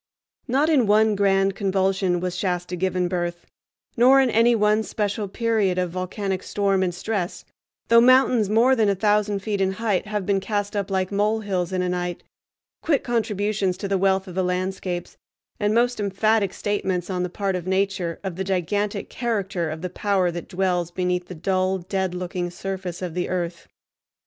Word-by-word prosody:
Not 275 +5 +2
in 280 -8 +3
one 215 +1 +4
grand 195 -1 +2
convulsion 190 -2 +1
was 180 0 -3
Shasta 180 -1 -2
given 180 0 0
birth, 175 -1 -3 0.5
nor 255 +3 +6
in 260 -3 +3
any 230 +2 +4
one 210 0 +3
special 210 -1 -2
period 215 -3 0
of 180 -2 0
volcanic 185 +1 -3
storm 195 -2 0
and 185 -1 +1
stress, 180 0 -3 0.4
though 230 0 +6
mountains 250 -4 +5
more 235 +5 +4
than 220 -4 +2
a 200 - +2
thousand 210 0 +1
feet 205 -2 -1
in 190 0 +1
height 210 -1 -1
have 210 -2 -2
been 195 0 +2
cast 205 +1 -2
up 200 -1 -2
like 190 -1 -1
molehills 205 -3 0
in 185 -1 0
a 180 - -1
night—quick 180 - -4
contributions 210 -5 -1
to 200 - -4
the 195 -1 0
wealth 190 0 +2
of 180 - -8
the 185 - 0
landscapes, 180 0 -3 0.4
and 205 -1 +1
most 245 0 +2
emphatic 205 0 +1
statements, 190 -3 -2
on 180 -1 -1
the 180 - -1
part 195 +1 -2
of 180 -1 -5
Nature, 190 -3 -1
of 190 -3 -4
the 190 - -1
gigantic 200 +2 -1
character 195 -8 -2
of 160 +2 -6
the 180 - -2
power 195 -4 +1
that 175 0 -6
dwells 180 -2 0
beneath 180 0 -2
the 180 - -8
dull, 185 +3 0
dead 190 0 -2
looking 180 0 -3
surface 185 0 -5
of 175 -3 -4
the 180 +1 -2
earth. 175 -2 -3
195 Hz, 180 wpm, -23 LUFS, 180-210 Hz, 0.5 s, nor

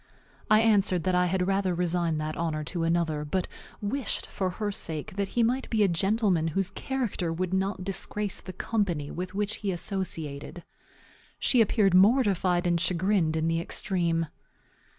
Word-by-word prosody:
I 215 +1 +6
answered 200 -6 +3
that 185 - +1
I 180 0 +3
had 180 0 0
rather 195 -1 +1
resign 170 -2 0
that 155 0 -3
honor 160 -2 -2
to 170 +3 -4
another, 165 -2 0
but 175 +5 -2 0.3
wished, 240 +4 -2
for 190 -1 -2
her 205 +3 -3
sake, 160 -3 -3
that 200 -1 -1
he 235 - +5
might 255 +4 0
be 220 -2 +2
a - - +5
gentleman 190 -1 +1
whose 185 +3 -1
character 240 -10 -2
would 180 +2 -2
not 190 0 -1
disgrace 195 +1 -2
the 185 - -8
company 180 -7 -2
with 185 +2 -5
which 210 +1 -1
he 200 -2 -2
associated. 170 -4 -4 0.7
She 250 - +4
appeared 205 -3 +3
mortified 190 -4 +4
and 170 -1 +2
chagrined 180 -2 +1
in 160 0 0
the 165 0 +1
extreme. 170 -3 -1
185 Hz, 165 wpm, -27 LUFS, 170-205 Hz, 0.7 s, I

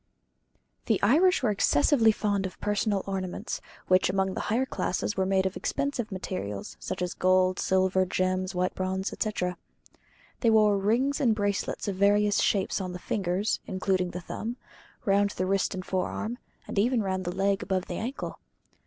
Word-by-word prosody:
The 220 -4 +2
Irish 330 - +4
were 225 - +3
excessively 220 - +4
fond 205 -2 0
of 185 - -13
personal 205 -1 0
ornaments, 190 -2 -4 0.3
which 185 0 +4
among 190 0 0
the - - -4
higher 240 +5 +2
classes 205 -4 -2
were 190 -1 0
made 190 0 +2
of 190 - -1
expensive 255 -6 -2
materials, 180 - -5
such - - -4
as 180 - -2
gold, 185 0 +2
silver, 190 0 +2
gems, 185 0 -1
white 180 +1 0
bronze, 190 0 -2
etc. 180 -5 -2 0.8
They 230 - +3
wore 210 -2 +4
rings 250 +9 +1
and 235 -5 +3
bracelets 205 -1 -1
of 195 -2 -2
various 205 +1 +3
shapes 195 0 +1
on 185 -1 -4
the - - -4
fingers 190 +2 -1
(including 185 -1 0
the 180 +1 -6
thumb), 230 +7 -5 0.5
round 200 0 +3
the 185 - 0
wrist 195 +1 0
and 185 -1 -5
forearm, 215 +5 -2 0.3
and - - -1
even 235 +1 +2
round 190 -1 -1
the 175 0 -4
leg 195 +1 +1
above 190 -1 -1
the - - -5
ankle. 245 +5 -5
195 Hz, 170 wpm, -28 LUFS, 185-215 Hz, 0.8 s, Irish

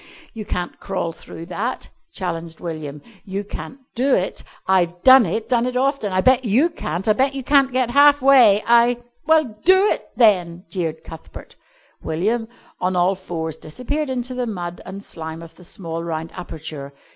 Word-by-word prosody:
"You 220 -2 -7
can't 175 -2 -4
crawl 165 - -3
through 165 0 -10
that," 240 +7 -3 0.2
challenged 165 -3 -5
William, 155 -4 -6 0.2
"you 195 +1 -4
can't 205 +5 -8 0.2
do 260 +3 +2
it. 185 - -2 0.2
I've 180 -2 +1
done 260 -5 +8
it, 220 +6 -3
done 240 0 +2
it 250 0 -2
often. 270 -5 0
I 185 0 +2
bet 255 +4 +4
you 255 - +3
can't. 175 - -4
I 215 - +5
bet 265 +4 +1
you 270 - -4
can't 275 0 +4
get 250 -1 0
halfway. 270 -6 +6
I 235 +1 +4
" 240 - -39
"Well, 310 -8 +3
do 375 +2 +6
it, - - -3
then!" 180 -6 +3
jeered 160 -4 -3
Cuthbert. 160 - -12 0.5
William, 220 +8 -1 0.3
on 185 0 0
all 180 +2 +3
fours, 165 -4 -5
disappeared 265 - -4
into 255 0 -3
the 250 -1 -2
mud 175 -5 -5
and 195 +2 -8
slime 160 -2 -7
of 165 - -12
the 180 - -17
small 165 -3 -5
round 165 -1 -4
aperture. 155 -5 -8
200 Hz, 175 wpm, -21 LUFS, 170-255 Hz, 0.5 s, done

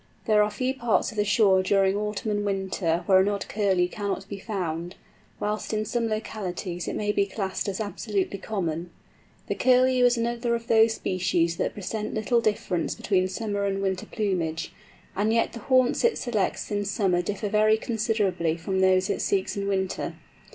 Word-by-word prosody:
There 215 -2 +4
are 210 - +3
few 255 +5 -1
parts 240 -4 +1
of 215 - -12
the 210 - +3
shore 205 -2 +4
during 195 0 +2
autumn 210 +1 -2
and 205 0 0
winter 190 -4 -1
where 190 -2 +6
an 190 +2 +3
odd 200 -1 -3
Curlew 195 -4 +1
cannot 195 +1 -4
be 200 0 -6
found, 175 -5 -4 0.4
whilst 210 +1 -2
in 215 0 0
some 235 +1 -1
localities 195 -5 -4
it - - -3
may 210 0 0
be 200 -1 +1
classed 195 -1 -3
as 195 - -4
absolutely 200 -1 -2
common. 175 -5 -3 0.6
The - - -1
Curlew 255 0 +4
is 245 0 +4
another 235 0 0
of 230 0 -5
those 225 -1 +4
species 175 -4 0
that - - -1
present 210 +2 -4
little 230 +2 +2
difference 200 -6 -1
between 185 -2 +1
summer 205 +1 -2
and 195 0 -1
winter 190 -1 -2
plumage, 175 -7 -2 0.4
and 210 +3 +1
yet 230 0 +1
the 235 - -7
haunts 255 +2 +2
it 475 0 +3
selects 215 -4 -1
in 205 0 0
summer 195 -3 +1
differ 205 +4 -3
very 215 +1 +4
considerably 215 -8 0
from 190 +3 -2
those 190 0 +4
it - - -1
seeks 195 -1 0
in 200 -1 -2
winter. 190 -1 -2
205 Hz, 180 wpm, -26 LUFS, 190-220 Hz, 0.6 s, where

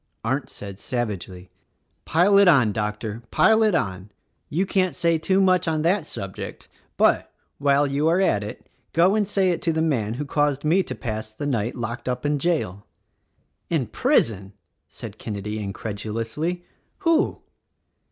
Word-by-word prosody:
Arndt 130 +5 -1
said 100 -1 -8
savagely, 100 -7 -4 0.5
"Pile 185 +5 +4
it 200 - +6
on, 130 -11 +5
Doctor,, 105 +1 -3
pile 220 0 +4
it 215 -4 +3
on! 95 - -2 0.4
You 180 +6 0
can't 185 -1 +1
say 170 -1 +2
too 190 +4 +2
much 185 -2 +3
on 155 -1 0
that 175 -1 +1
subject; 95 -1 -7 0.3
but, - - +3 0.3
while 140 0 +3
you 140 +2 0
are 170 +3 +3
at 105 - +2
it, 105 - -8 0.3
go 175 +4 +4
and 210 -2 +1
say 195 -2 +2
it 170 - -2
to 165 - +1
the 160 - -1
man 120 -9 0
who 145 +4 -3
caused 145 -1 0
me 170 +5 +4
to - - -5
pass 110 -2 -5
the 110 +7 -6
night 120 -5 -1
locked 120 +1 -4
up 125 +2 -3
in 145 0 +1
jail." 135 - -1 0.8
"In 160 -7 +1
prison!" 110 - +1 0.4
said - - -9
Kenedy 105 0 -4
incredulously. 115 - -4 0.4
"Who?" 330 +2 +2
140 Hz, 160 wpm, -24 LUFS, 110-175 Hz, 0.8 s, it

